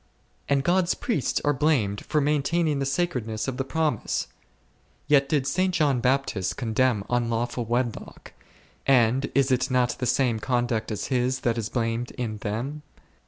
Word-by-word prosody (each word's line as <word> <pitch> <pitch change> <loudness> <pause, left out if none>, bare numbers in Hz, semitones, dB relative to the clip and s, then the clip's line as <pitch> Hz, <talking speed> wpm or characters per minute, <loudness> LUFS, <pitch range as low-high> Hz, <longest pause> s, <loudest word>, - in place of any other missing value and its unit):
And 140 -1 +2
God's 175 +2 +2
priests 220 - -1
are 145 - +3
blamed 125 -9 +1
for 155 - +1
maintaining 150 +1 +1
the 135 - -1
sacredness 130 -9 -2
of 130 -1 -3
the 135 - 0
promise! 150 -3 -1 0.8
Yet 140 -2 +3
did 145 -3 +1
St. 185 +5 +1
John 145 -7 +2
Bap 130 +3 +2
tist 95 -3 -3
condemn 115 -2 +1
unlawful 120 0 -1
wedlock; 120 0 -3 0.5
and 130 0 +3
is 135 -1 +3
it 130 +2 +1
not 125 -1 +1
the 125 - -1
same 125 -5 +1
conduct 120 -2 -1
as 105 -1 -4
his, 130 +1 0
that 120 -2 +1
is 110 -2 -3
blamed 115 0 -1
in 110 -3 -3
them 120 +9 -4
130 Hz, 160 wpm, -25 LUFS, 115-140 Hz, 0.8 s, are